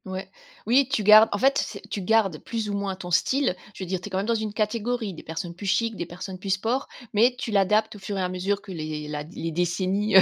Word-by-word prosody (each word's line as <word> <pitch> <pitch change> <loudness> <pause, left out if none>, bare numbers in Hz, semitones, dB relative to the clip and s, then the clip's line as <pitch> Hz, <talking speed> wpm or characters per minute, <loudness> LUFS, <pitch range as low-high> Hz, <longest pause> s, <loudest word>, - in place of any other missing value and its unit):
Ouais, 190 0 -6 0.3
oui 260 +4 +4
tu 230 -6 +1
gardes, 215 +2 +8
en 205 - 0
fait 270 +6 +3
c'est 200 - -8
tu 200 - -4
gardes 195 -4 +2
plus 220 -3 -3
ou - - -3
moins 200 -1 -2
ton 180 -1 -8
style, 260 +5 +2 0.2
je - - -6
veux - - -6
dire 185 0 -2
tu 185 - -7
es - - -7
quand 190 - -2
même 195 - 0
dans 230 - +2
une 220 -2 -2
catégorie, 220 0 -1
des - - -9
personnes 170 +2 -5
plus 195 +3 -7
chic, 225 +3 +1
des 175 - -4
personnes 185 +1 -7
plus 195 - -6
sport, 225 +8 0 0.3
mais 235 +4 +4
tu 240 - -4
l'adaptes 210 +2 +2
au - - -13
fur 200 +1 -4
et - - 0
à 180 - 0
mesure 195 +2 -1
que 195 - -9
les 155 -3 -4
la 150 0 -4
les 165 +2 -5
décennies, 185 +5 0
heu, - - +11
200 Hz, 270 wpm, -25 LUFS, 180-220 Hz, 0.3 s, heu